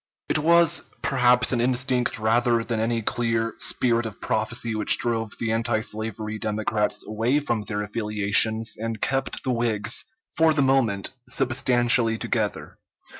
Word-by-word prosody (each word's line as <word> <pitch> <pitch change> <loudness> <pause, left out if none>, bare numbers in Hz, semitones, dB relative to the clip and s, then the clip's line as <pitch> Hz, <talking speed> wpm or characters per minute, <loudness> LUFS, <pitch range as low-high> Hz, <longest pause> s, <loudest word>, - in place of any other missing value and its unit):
It - - +1
was 170 +1 +4 0.2
perhaps 125 -1 +3
an 120 -3 +1
instinct 125 0 +1
rather 115 +1 +1
than 115 -1 -3
any 115 0 -1
clear 115 0 -1
spirit 120 -2 +1
of 105 - -10
prophecy 110 +1 -1
which 110 -1 +3
drove 115 -2 -2
the 115 -1 -2
antislavery 110 -1 -2
Democrats 105 0 -1
away 115 +6 0
from 120 -7 -2
their 105 -1 -3
affiliations 105 +1 0
and 115 -1 -4
kept 135 +3 -2
the 130 - -1
Whigs, 115 -2 0 0.3
for 160 -1 +3
the 145 - +3
moment, 125 -7 +1 0.2
substantially 120 -2 +2
together. - - -3
115 Hz, 135 wpm, -24 LUFS, 110-125 Hz, 0.3 s, was